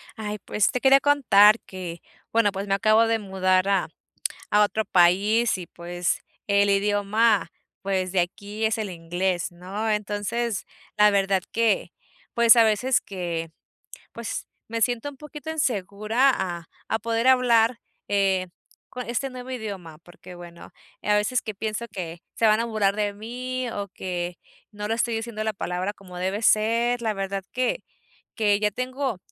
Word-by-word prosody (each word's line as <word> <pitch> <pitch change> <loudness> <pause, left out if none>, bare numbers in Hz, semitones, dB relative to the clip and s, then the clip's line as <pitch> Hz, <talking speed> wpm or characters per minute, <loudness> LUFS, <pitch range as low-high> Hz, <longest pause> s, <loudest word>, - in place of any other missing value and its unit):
Ay, 210 -1 -5
pues, 210 +1 +1
te 250 - -1
quería 270 +1 +6
contar 230 -7 +5
que 175 -3 -8 0.3
bueno, 225 -2 +3
pues 195 +1 -5
me 195 - +1
acabo 215 +3 +4
de 225 0 +1
mudar 185 -1 +1
a 195 -4 +2 0.6
a 210 0 +5
otro 215 +1 +1
país 200 +5 +3
y, 180 - -7
pues, 175 +1 -3 0.3
el 200 0 +3
idioma, 205 +2 +2 0.3
pues 190 -2 -1
de 190 - +3
aquí 205 +5 -4
es 220 0 +2
el 215 -3 -3
inglés, 175 +1 -2
¿no? 190 +5 -4
Entonces, 210 +1 -2 0.3
la 210 0 +6
verdad 195 -1 +2
que, 230 -2 +1 0.4
pues, 235 0 +7
a 230 - +7
veces 225 +4 +2
que, 170 -4 -4 0.6
pues, 235 -1 -5 0.2
me 230 0 -3
siento 245 +4 0
un 275 - -14
poquito 300 +1 -9
insegura 225 -2 +1
a 175 -3 -4 0.2
a 220 - 0
poder 230 +2 0
hablar, 240 -2 +4 0.3
eh, 195 -2 +1 0.4
co 250 - -6
este 245 +3 -2
nuevo 255 0 -8
idioma 200 -10 -6
porque 175 +1 -14
bueno, 175 -1 -12 0.3
eh, - - -3
a - - +5
veces 210 +4 +1
que 215 - -5
pienso 215 +3 -4
que 175 -3 -6
se 225 - +2
van 215 0 +4
a 230 - 0
burlar 210 -3 +1
de 205 -1 -1
mí 250 +4 -4
o 200 -2 -4
que 175 -1 -4 0.3
no 210 0 -5
lo 225 - 0
estoy 235 0 0
diciendo 225 -1 -4
la 220 0 -1
palabra 185 +1 -3
como 185 -3 -12
debe 190 +4 -2
ser. 230 +3 +2
La 220 -2 0
verdad 195 -1 -3
que 255 -1 -1 0.5
que 205 -3 +2
ya 210 0 +1
tengo, 255 0 -3
210 Hz, 165 wpm, -25 LUFS, 190-230 Hz, 0.6 s, pues